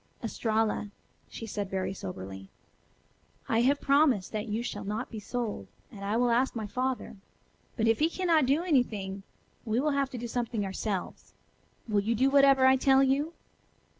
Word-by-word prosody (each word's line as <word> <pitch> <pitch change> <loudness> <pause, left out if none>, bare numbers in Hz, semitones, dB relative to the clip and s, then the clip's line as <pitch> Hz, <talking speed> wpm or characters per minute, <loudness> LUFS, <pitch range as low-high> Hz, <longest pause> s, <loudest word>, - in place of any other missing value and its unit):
"Estralla," 220 -2 -1 0.4
she 225 - -7
said 205 -2 -4
very 190 0 -2
soberly, 95 - -8 1.0
"I 225 0 +2
have 280 +4 +3
promised 275 -9 +3
that 215 +1 -3
you 220 +2 -2
shall 205 -3 -5
not 210 +5 -4
be 220 - -5
sold, 235 +1 -4 0.2
and 200 -2 -10
I 205 +3 0
will 245 0 +2
ask 250 +3 +2
my 220 -2 -3
father. 255 0 -3 0.6
But 225 -1 +1
if 225 -1 +3
he 315 +2 +3
cannot 335 -6 +2
do 290 +6 +2
anything, 215 - 0 0.4
we 225 0 0
will 300 +3 +1
have 280 -1 0
to 255 - -7
do 240 0 -5
something 230 -3 -2
ourselves. 195 0 -4 0.5
Will 210 -2 +2
you 225 +3 0
do 265 +4 +2
whatever 275 -1 +6
I 260 0 +6
tell 270 +1 +4
you?" 280 +5 +1
235 Hz, 170 wpm, -29 LUFS, 210-265 Hz, 1.0 s, whatever